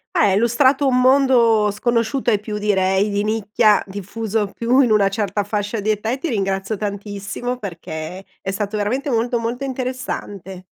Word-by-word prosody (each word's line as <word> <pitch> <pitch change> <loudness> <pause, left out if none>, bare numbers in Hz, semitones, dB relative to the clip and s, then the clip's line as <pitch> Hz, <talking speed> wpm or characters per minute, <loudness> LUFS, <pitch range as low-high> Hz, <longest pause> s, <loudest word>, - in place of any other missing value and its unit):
Eh, - - +2
hai 195 - +3
illustrato 260 +5 +3
un 250 -1 +3
mondo 250 -5 +4
sconosciuto 235 +4 0
ai 210 -3 +2
più 210 0 -5
direi 195 -1 +1
di 205 0 0
nicchia, 215 0 +2
diffuso 205 +2 -3
più 240 +3 +2
in 250 -4 +3
una 210 -2 +4
certa 205 0 -2
fascia 205 +2 -2
di 210 +1 -1
età 215 +1 -1
e 255 - -1
ti 335 - -3
ringrazio 195 -3 -1
tantissimo, 205 +4 -4
perché 170 -2 -7 0.2
è 195 - -3
stato 205 +2 -3
veramente 230 +8 -1
molto, 240 -1 +1
molto 235 +3 -3
interessante. 250 -8 -5
215 Hz, 165 wpm, -20 LUFS, 200-245 Hz, 0.2 s, mondo